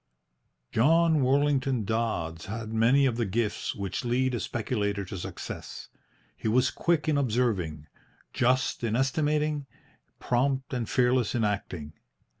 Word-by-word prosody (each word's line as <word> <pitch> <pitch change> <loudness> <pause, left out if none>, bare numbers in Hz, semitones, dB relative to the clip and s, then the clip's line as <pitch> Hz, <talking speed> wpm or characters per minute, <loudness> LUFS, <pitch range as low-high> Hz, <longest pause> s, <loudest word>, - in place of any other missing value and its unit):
John 160 +5 +4
Worlington 135 -3 +2
Dodds 95 -7 -2
had 110 +1 -5
many 120 +5 +4
of 120 -3 +1
the 120 - 0
gifts 105 +1 -1
which 100 -2 -3
lead 125 +2 +1
a 120 - -1
speculator 105 -1 -2
to 95 - -7
success. 85 - -7 0.5
He - - -5
was 125 +3 +3
quick 170 -3 0
in 150 -2 +2
observing, 105 - 0 0.5
just 130 0 +1
in 115 -1 0
estimating, 150 +2 0 0.5
prompt 130 +2 0
and 120 -3 -2
fearless 125 -2 +2
in 115 - +1
acting. 90 -7 -3
120 Hz, 130 wpm, -28 LUFS, 105-135 Hz, 0.5 s, John